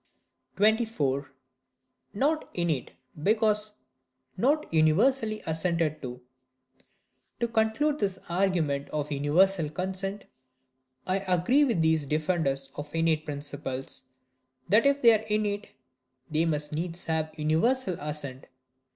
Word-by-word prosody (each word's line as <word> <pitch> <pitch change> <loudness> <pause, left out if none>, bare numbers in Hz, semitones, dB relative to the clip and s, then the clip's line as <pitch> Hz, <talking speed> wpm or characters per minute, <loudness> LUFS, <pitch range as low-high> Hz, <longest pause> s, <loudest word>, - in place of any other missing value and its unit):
24. 200 - +1 0.8
Not 300 +8 +1
innate 165 -7 -1 0.3
because 210 +2 +2 0.6
not 290 +9 +2
universally 215 - +3
assented 160 -1 0
to. 125 -1 -6 1.2
To 235 - +1
conclude 230 +7 +1
this 195 -2 0
argument 170 -6 0
of 150 0 -3
universal 155 +4 +2
consent, 190 +4 -4 0.8
I 185 +1 +1
agree 195 - +3
with 225 - +1
these 160 -2 +2
defenders 150 -3 0
of 145 +2 -7
innate 165 -1 +1
principles,—that 130 - -3
if 280 -1 +2
they 235 - +9
are 220 0 0
innate, 210 -1 -1 0.6
they 160 +2 +2
must 150 -2 -1
needs 170 +3 -3
have 160 -1 -2
universal 180 +8 +1
assent. 145 -3 -5
165 Hz, 105 wpm, -28 LUFS, 150-210 Hz, 1.2 s, they